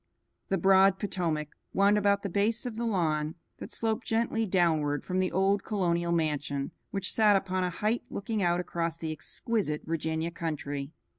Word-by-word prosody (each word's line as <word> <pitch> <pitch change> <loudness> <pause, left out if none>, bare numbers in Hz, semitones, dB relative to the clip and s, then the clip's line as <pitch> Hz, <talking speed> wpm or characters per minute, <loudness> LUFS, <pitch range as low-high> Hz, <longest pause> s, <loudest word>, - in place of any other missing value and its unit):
The 195 - +2
broad 190 +1 +5
Potomac 170 -7 -2 0.3
wound 200 +1 +5
about 200 -1 +2
the - - -1
base 215 +6 0
of 245 -3 -4
the 235 +1 -2
lawn 160 -6 0 0.2
that - - -8
sloped 225 +1 -1
gently 225 0 +1
downward 160 -6 +2
from 185 0 -1
the 185 -1 +1
old 195 +2 +2
colonial 170 -5 0
mansion 145 -4 -1 0.2
which 195 -1 -2
sat 215 -2 +5
upon 185 -1 0
a 180 - +1
height 215 +6 0
looking 215 +1 -3
out 175 -1 +2
across 170 -2 -2
the 160 -1 -4
exquisite 155 0 -2
Virginia 160 +1 -2
country. 145 -4 -4
185 Hz, 165 wpm, -29 LUFS, 160-205 Hz, 0.3 s, broad